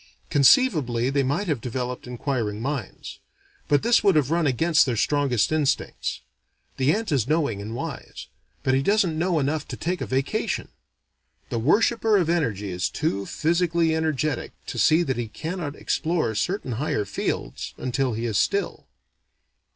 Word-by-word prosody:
Conceivably 140 - +4
they 140 0 +2
might 140 +10 0
have 145 -8 -1
developed 125 +1 -4
inquiring 120 -4 -2
minds. 130 -3 -5 0.5
But 145 - +2
this 235 0 +4
would 195 -4 +4
have 150 -2 +2
run 165 -2 +2
against 160 +4 +3
their 125 - 0
strongest 135 -4 +1
instincts. 155 -3 -1 0.6
The 135 +2 +3
ant 220 +2 -1
is 130 -5 +1
knowing 145 -9 0
and 110 +3 -6
wise; - - -6 0.4
but 130 - +2
he 135 - +3
doesn't 195 -1 +2
know 170 +1 +1
enough 150 +1 -1
to - - -6
take 180 +2 -2
a - - -3
vacation. 135 +1 -1 0.8
The 115 - -1
worshipper 215 - +3
of 170 -4 +1
energy 105 - -1
is 90 0 -1
too 100 -11 -2
physically 170 0 +1
energetic 155 -3 -1
to - - -5
see 160 +3 +4
that 130 -6 -2
he 120 -2 -2
cannot 160 - -5
explore 160 -8 -1
certain 155 - -2
higher 115 -3 -1
fields - - -4
until 130 0 -1
he 115 +2 -3
is 110 -4 +1
still. 200 0 -1
145 Hz, 160 wpm, -24 LUFS, 125-165 Hz, 0.8 s, Conceivably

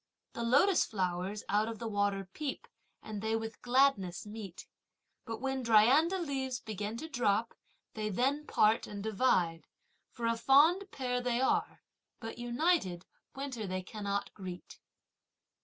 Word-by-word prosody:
The - - -5
lotus 275 +11 +4
flowers 185 0 -2
out 210 +2 +2
of 225 -1 -5
the 230 - -5
water 205 -2 0
peep, 295 -3 -4 0.4
and 210 -2 -6
they 220 +1 0
with 225 0 -5
gladness 245 -9 +2
meet, 210 -4 -8 0.6
But 225 -1 -5
when 265 0 -1
dryandra 250 - +5
leaves 265 -7 -2
begin 215 +1 -5
to 315 - -6
drop, 230 -5 0 0.4
they 215 -1 -3
then 275 +8 0
part 215 +1 +3
and 200 -1 -6
divide, 190 -7 +1 0.4
For 235 - -6
a 230 0 +1
fond 315 +11 +5
pair 250 -5 -2
they 245 -1 0
are, 260 - 0 0.4
but, 225 0 -7
united, 240 - 0 0.3
winter 265 -6 -4
they 185 0 -3
cannot 200 0 -4
greet. 185 -3 -9
225 Hz, 140 wpm, -32 LUFS, 205-265 Hz, 0.6 s, dryandra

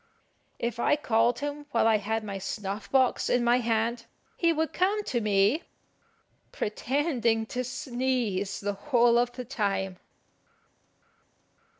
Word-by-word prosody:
If 235 -1 -3
I - - +3
called 235 -4 +1
him 290 0 -4
while 230 - +2
I 220 -1 +5
had 220 +2 -2
my 200 -2 -5
snuff 200 +1 -5
box 260 -2 +2
in 245 -1 +2
my 240 +1 +4
hand, 230 0 -1 0.3
he 335 -1 +2
would 320 0 -1
come 400 +4 +1
to 240 - -1
me, 210 +7 +3 0.9
pretending 235 -1 0
to 250 +2 -3
sneeze 245 -6 -2
the 205 0 -1
whole 240 +1 +3
of 245 0 +1
the 250 0 -6
time. 195 -6 -2
235 Hz, 130 wpm, -28 LUFS, 215-260 Hz, 0.9 s, I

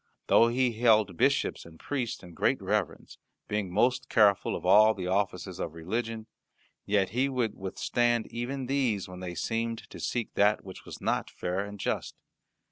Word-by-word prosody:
Though 115 - +5
he 125 0 +1
held 110 -4 +3
bishops - - +1
and 80 -1 -15
priests 125 -9 -3
in 90 -1 -12
great - - +1
reverence, - - -3 0.3
being 105 -3 -2
most 125 +6 +1
careful 105 -3 +3
of - - -6
all 110 +1 +6
the 95 -2 -5
offices 95 -1 -1
of 85 -1 -4
religion, 110 +6 -3 0.6
yet 100 -2 +2
he 130 +6 +1
would 125 -5 -1
withstand 120 +4 0
even 130 +3 -4
these 125 -7 0
when 90 0 -9
they 90 -1 -6
seemed 115 +5 -2
to - - -9
seek 120 -2 -3
that 105 +1 +3
which 95 - -10
was - - -9
not - - -1
fair 90 +2 -3
and 100 0 -8
just. - - -2
110 Hz, 170 wpm, -29 LUFS, 95-120 Hz, 0.6 s, all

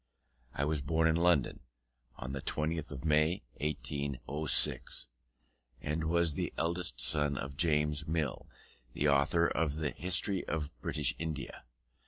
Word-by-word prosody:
I 70 - 0
was 75 -1 -1
born 80 +4 +1
in 80 - +2
London, 85 -5 +2 0.6
on 65 - -6
the 70 - -4
20th 80 0 -2
of 70 +1 -8
May, 75 +2 +2 0.2
1806, 70 -1 +1 0.7
and 75 +2 -3
was 85 -1 +2
the - - -3
eldest 85 -5 0
son 75 +2 +2
of 70 0 -5
James 75 -1 +1
Mill, 80 -2 -2 0.5
the 75 - 0
author 75 +4 +3
of 80 -4 -1
the 80 -2 -2
History 90 +2 +2
of 75 -2 -3
British - - +2
India. 75 -6 -5
75 Hz, 135 wpm, -32 LUFS, 70-80 Hz, 0.7 s, author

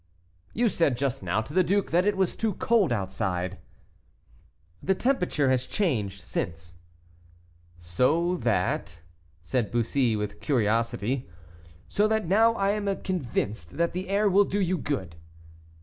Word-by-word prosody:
"You 235 +2 +3
said 165 - +1
just 135 -1 -1
now 95 +4 0
to 125 +7 -9
the 185 +1 +4
duke 200 +2 0
that 180 +4 +3
it 205 - +1
was 190 -2 +1
too 220 -4 -1
cold 210 - +2
outside." 95 -3 -2 1.2
"The 190 - +1
temperature 180 - +1
has 130 0 0
changed 110 - -1
since." 85 -2 -5 1.0
"So 130 - +1
that 85 - -1 0.2
" 85 0 -33
said 115 +5 -1
Bussy, 120 0 +1
with 105 -1 -4
curiosity. 115 - 0 0.6
"So 210 +1 +2
that 220 -1 0
now 225 +6 +4
I 195 -2 +1
am 200 -2 -2
convinced 110 - -3
that 170 0 +1
the 185 +1 -4
air 205 +2 +2
will 200 +1 +5
do 205 - -2
you 185 -2 0
good." 95 - -3
140 Hz, 145 wpm, -27 LUFS, -, 1.2 s, will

